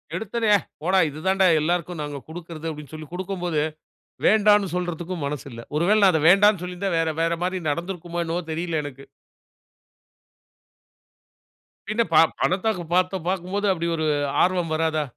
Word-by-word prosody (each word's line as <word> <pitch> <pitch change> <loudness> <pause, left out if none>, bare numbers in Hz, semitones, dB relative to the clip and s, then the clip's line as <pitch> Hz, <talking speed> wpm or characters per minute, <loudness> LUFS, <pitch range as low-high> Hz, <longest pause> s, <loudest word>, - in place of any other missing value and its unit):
எடுத்தோனே 220 +3 -1
"அ - - +6 0.2
போடா! 185 +3 +2
இது 150 +1 -9
தான்டா 190 0 +3 0.2
எல்லாருக்கு 175 +2 -1
நாங்க 145 -1 -5
குடுக்கிறது" 165 -1 -8
அப்டினு 150 -3 -10
சொல்லி 155 -1 -8
குடுக்குபோது, 180 -4 -2 0.6
வேண்டானு 210 -1 +5
சொல்றதுக்கும் 175 -2 -3
மனசில்ல. 140 -4 -6
ஒருவேள 195 +8 +3
நான் 190 - +7
அத 160 - +1
வேண்டானு 200 0 +5
சொல்லியிருந்தா 180 +2 -3
வேற 165 - +1
வேற 165 0 +1
மாரி 185 +1 -1
நடந்திருக்குமோ 175 +2 -3
என்னவோ 170 +2 -2
தெரியல 165 -1 -2
எனக்கு. 135 -1 -9 2.8
பின்ன 215 +2 +1
ப 155 - +6 0.2
பணத்தாக்கு 185 0 0
பணத 180 0 +4
பாக்கு 190 - -3
பார்க்குபோது 190 +2 -2
அப்டி 170 -1 -3
ஒரு 160 -1 -2 0.4
ஆர்வம் 180 -3 0
வராதா? 155 -1 0
175 Hz, 140 wpm, -24 LUFS, 160-190 Hz, 2.8 s, நான்